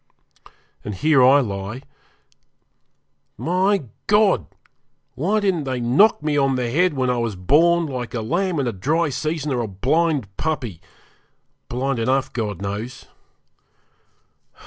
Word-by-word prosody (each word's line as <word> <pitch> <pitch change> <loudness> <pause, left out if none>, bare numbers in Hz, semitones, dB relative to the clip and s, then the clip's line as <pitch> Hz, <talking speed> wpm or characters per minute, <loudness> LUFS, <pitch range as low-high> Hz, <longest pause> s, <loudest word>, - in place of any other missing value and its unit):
And 105 - -5
here 150 +4 +3
I 135 +3 +6
lie 100 +2 -5 1.5
my 185 +3 +1 0.2
God! 205 - +3 0.7
why 195 +9 0
didn't 190 -7 0
they 130 -1 -2
knock 140 - +3
me 150 -1 0
on 135 -1 +2
the 125 -2 -2
head 175 +3 +2
when 130 -1 +1
I 125 - -1
was 115 -3 -2
born, 165 - +3
like 125 -5 -5
a 115 - -2
lamb 170 - -1
in 135 - 0
a 120 - 0
dry 150 - 0
season, 150 +1 -2
or 125 - 0
a 115 - -3
blind 130 - 0
puppy 125 - -3 0.9
blind 130 +1 -1
enough, 130 +4 0
God 105 -5 -3
knows! 105 +5 -5
135 Hz, 135 wpm, -21 LUFS, 115-160 Hz, 1.5 s, I